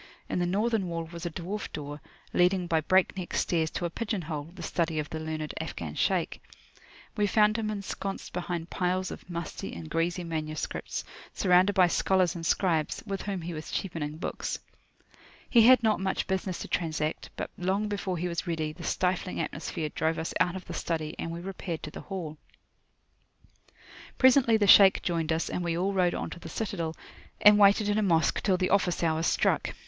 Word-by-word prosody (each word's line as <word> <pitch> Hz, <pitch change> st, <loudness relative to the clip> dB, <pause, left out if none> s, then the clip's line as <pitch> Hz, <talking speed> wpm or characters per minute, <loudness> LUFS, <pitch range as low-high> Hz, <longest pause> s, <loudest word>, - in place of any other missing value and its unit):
In -, -, -1 dB
the 175 Hz, -, +1 dB
northern 210 Hz, +1 st, +1 dB
wall 165 Hz, -1 st, -3 dB
was 170 Hz, 0 st, -5 dB
a -, -, -2 dB
dwarf 180 Hz, +6 st, -5 dB
door, 145 Hz, -1 st, -6 dB, 0.3 s
leading 180 Hz, 0 st, +3 dB
by 165 Hz, -2 st, +1 dB
breakneck 185 Hz, +1 st, +1 dB
stairs 160 Hz, -2 st, +1 dB
to 175 Hz, -, -3 dB
a 170 Hz, -, -2 dB
pigeon 210 Hz, -2 st, -3 dB
hole, 150 Hz, -1 st, -5 dB
the 175 Hz, -1 st, -10 dB
study 165 Hz, 0 st, -1 dB
of 150 Hz, -1 st, -3 dB
the 160 Hz, -, -3 dB
learned 155 Hz, -1 st, -4 dB
Afghan 85 Hz, -, -5 dB
Shaykh. -, -, 0 dB, 0.7 s
We 205 Hz, -1 st, +2 dB
found 210 Hz, +1 st, +4 dB
him 220 Hz, -1 st, -1 dB
ensconced 200 Hz, -1 st, -5 dB
behind 175 Hz, -1 st, -4 dB
piles 185 Hz, 0 st, 0 dB
of -, -, -10 dB
musty 170 Hz, -2 st, -5 dB
and 80 Hz, -2 st, -8 dB
greasy 175 Hz, +2 st, 0 dB
manuscripts, 155 Hz, -2 st, -4 dB, 0.3 s
surrounded 185 Hz, +1 st, +4 dB
by 185 Hz, -1 st, +6 dB
scholars 180 Hz, 0 st, +2 dB
and 170 Hz, -, -6 dB
scribes, 165 Hz, -1 st, +1 dB
with 195 Hz, -1 st, -3 dB
whom 195 Hz, -3 st, -3 dB
he 175 Hz, +1 st, -4 dB
was 155 Hz, 0 st, -7 dB
cheapening 155 Hz, -5 st, -3 dB
books. 170 Hz, -, -3 dB, 0.9 s
He 230 Hz, -2 st, +6 dB
had 255 Hz, -1 st, +7 dB
not 215 Hz, -1 st, +3 dB
much 190 Hz, 0 st, -1 dB
business 190 Hz, -1 st, -2 dB
to -, -, -5 dB
transact; 155 Hz, -2 st, -2 dB
but -, -, -5 dB
long 190 Hz, +4 st, 0 dB
before 195 Hz, -3 st, -2 dB
he 175 Hz, +2 st, -1 dB
was 170 Hz, +1 st, -3 dB
ready, 160 Hz, -2 st, -2 dB
the 175 Hz, -, -11 dB
stifling 180 Hz, +2 st, -1 dB
atmosphere 155 Hz, -1 st, -3 dB
drove 160 Hz, +2 st, -1 dB
us 160 Hz, -, -3 dB
out 175 Hz, 0 st, +2 dB
of 185 Hz, -, -7 dB
the -, -, -7 dB
study, 160 Hz, -2 st, -2 dB
and -, -, -3 dB
we 170 Hz, +1 st, -5 dB
repaired 180 Hz, -3 st, -5 dB
to 155 Hz, -, -6 dB
the -, -, -8 dB
hall. 170 Hz, -6 st, -6 dB, 1.8 s
Presently 255 Hz, -3 st, +6 dB
the 205 Hz, -, +2 dB
Shaykh 195 Hz, 0 st, +8 dB
joined 165 Hz, -2 st, 0 dB
us, 160 Hz, +1 st, 0 dB
and 180 Hz, -, -3 dB
we 170 Hz, -1 st, -1 dB
all 190 Hz, +3 st, 0 dB
rode 180 Hz, -2 st, +2 dB
on -, -, -4 dB
to -, -, -8 dB
the 165 Hz, -, -9 dB
citadel, 170 Hz, -6 st, -3 dB, 0.4 s
and 210 Hz, 0 st, +7 dB
waited 205 Hz, +1 st, +6 dB
in 205 Hz, +1 st, +2 dB
a -, -, +2 dB
Mosque 170 Hz, -5 st, +2 dB
till 190 Hz, -3 st, +2 dB
the 185 Hz, 0 st, 0 dB
office 185 Hz, -3 st, +2 dB
hour 160 Hz, -1 st, +1 dB
struck. 165 Hz, -, +1 dB
175 Hz, 195 wpm, -28 LUFS, 160-195 Hz, 1.8 s, Shaykh